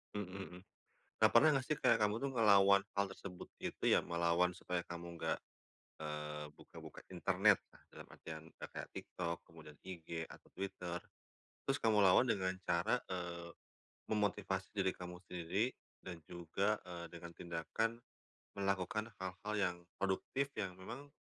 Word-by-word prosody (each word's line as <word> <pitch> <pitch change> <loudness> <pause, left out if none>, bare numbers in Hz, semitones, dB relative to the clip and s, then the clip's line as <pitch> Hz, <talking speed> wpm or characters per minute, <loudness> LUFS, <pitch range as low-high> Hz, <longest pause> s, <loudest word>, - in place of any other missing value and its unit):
Mhm 105 -2 -2
mhm. 95 -1 -7 0.6
Kak - - +6
pernah 155 - +9
nggak 135 -3 +2
sih 155 - +2
kayak 120 -5 +5
kamu 105 0 +3
tuh 140 - +1
ngelawan 100 -5 +7 0.2
hal 100 - +3
tersebut 95 -2 -8
itu - - -4
ya, - - +7
melawan 85 +1 +3
supaya 90 -1 -2
kamu 85 0 -6
enggak, - - +1 0.7
eee, 75 -1 -4
buka-buka - - -11
internet, - - +4 0.3
dalam - - -8
artian 80 -1 -7 0.2
kayak - - -6
TikTok, 85 -2 -3
kemudian 80 -2 -12
IG, 85 -2 -4
atau - - -14
Twitter. 90 -2 -3 0.7
Terus 135 +1 +2
kamu 110 -2 +5
lawan 95 +7 +7
dengan 95 -3 +1
cara, - - +2
eee, 85 -2 -3 0.6
memotivasi 100 -3 +1
diri 95 -2 +3
kamu 90 0 -7
sendiri 90 +9 0 0.3
dan 90 -3 -6
juga, 90 +5 +1
eee, 85 -1 -6
dengan 85 0 -8
tindakan 85 +8 -1 0.6
melakukan 100 +3 0
hal-hal 100 +3 -3
yang 90 -3 +2 0.2
produktif 100 +8 +1
yang 95 -4 -1
memang 135 +9 -7
95 Hz, 140 wpm, -38 LUFS, 85-105 Hz, 0.7 s, pernah